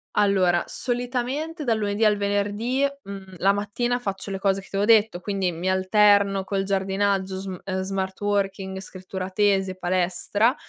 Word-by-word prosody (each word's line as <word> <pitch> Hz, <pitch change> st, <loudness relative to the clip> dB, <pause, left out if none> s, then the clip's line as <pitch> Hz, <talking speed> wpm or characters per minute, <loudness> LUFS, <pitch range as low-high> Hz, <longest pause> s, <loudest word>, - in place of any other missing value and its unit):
Allora, 190 Hz, -4 st, +3 dB
solitamente 255 Hz, +6 st, -3 dB
dal 230 Hz, -5 st, +1 dB
lunedì 205 Hz, 0 st, -1 dB
al 210 Hz, -1 st, +4 dB
venerdì, 205 Hz, +6 st, 0 dB, 0.2 s
mhmm, 195 Hz, -1 st, -9 dB
la 195 Hz, +3 st, +3 dB
mattina 225 Hz, +5 st, -1 dB
faccio 195 Hz, -3 st, -4 dB
le 195 Hz, -, -3 dB
cose 195 Hz, 0 st, +1 dB
che 195 Hz, -, -12 dB
ti -, -, -8 dB
avevo 205 Hz, +3 st, +3 dB
detto, 215 Hz, -5 st, +4 dB
quindi 195 Hz, -1 st, -1 dB
mi 175 Hz, +3 st, -3 dB
alterno 200 Hz, +1 st, +4 dB
col 195 Hz, 0 st, -1 dB
giardinaggio 195 Hz, 0 st, 0 dB
sm 190 Hz, -1 st, -6 dB, 0.2 s
smart 190 Hz, 0 st, -3 dB
working, 195 Hz, -2 st, -1 dB
scrittura 185 Hz, 0 st, -7 dB
tesi 195 Hz, -1 st, +2 dB
e 185 Hz, -, -10 dB
palestra, 185 Hz, +6 st, +1 dB
195 Hz, 155 wpm, -24 LUFS, 190-210 Hz, 0.2 s, al